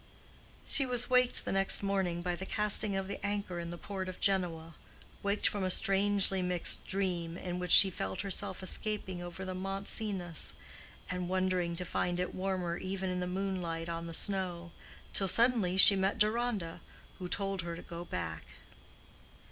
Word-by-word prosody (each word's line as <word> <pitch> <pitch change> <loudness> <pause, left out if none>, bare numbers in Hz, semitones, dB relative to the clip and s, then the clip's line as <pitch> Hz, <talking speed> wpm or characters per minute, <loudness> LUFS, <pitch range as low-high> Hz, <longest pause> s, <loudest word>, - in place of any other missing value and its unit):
She 275 - +5
was 245 -1 +1
waked 250 -1 +3
the - - -3
next 195 +1 +3
morning 190 -3 -1
by 175 -1 -1
the 185 - -7
casting 210 -1 +2
of 195 0 -3
the 200 - -7
anchor 200 -3 -3
in 170 0 -5
the 175 - -7
port 190 0 -5
of 185 - -9
Genoa—waked 180 +2 -2
from 205 -2 -2
a 185 - 0
strangely 195 0 +1
mixed 180 -1 +3
dream 180 -3 -2
in 180 -1 -5
which 180 0 -4
she 190 +3 +10
felt 95 - -4
herself 195 -1 -2
escaping 190 -2 -2
over 175 +2 -7
the 185 - -4
Mont 195 +2 -5
Cenis, 185 -7 -1 0.6
and 180 -1 -3
wondering 185 -2 0
to 180 +1 -4
find 175 +1 -2
it 180 - -3
warmer 185 -2 -2
even 190 0 -4
in 180 - -2
the 180 - -3
moonlight 180 -3 -3
on 170 0 -5
the 165 - -3
snow, 180 -4 0 0.4
till 195 - +2
suddenly 220 -3 +3
she 195 +1 +8
met 195 +2 0
Deronda, 215 -6 -1 0.4
who 180 - -5
told 195 0 -2
her 170 0 -5
to - - -10
go 170 0 -8
back. 80 - -6
185 Hz, 170 wpm, -31 LUFS, 175-195 Hz, 0.6 s, she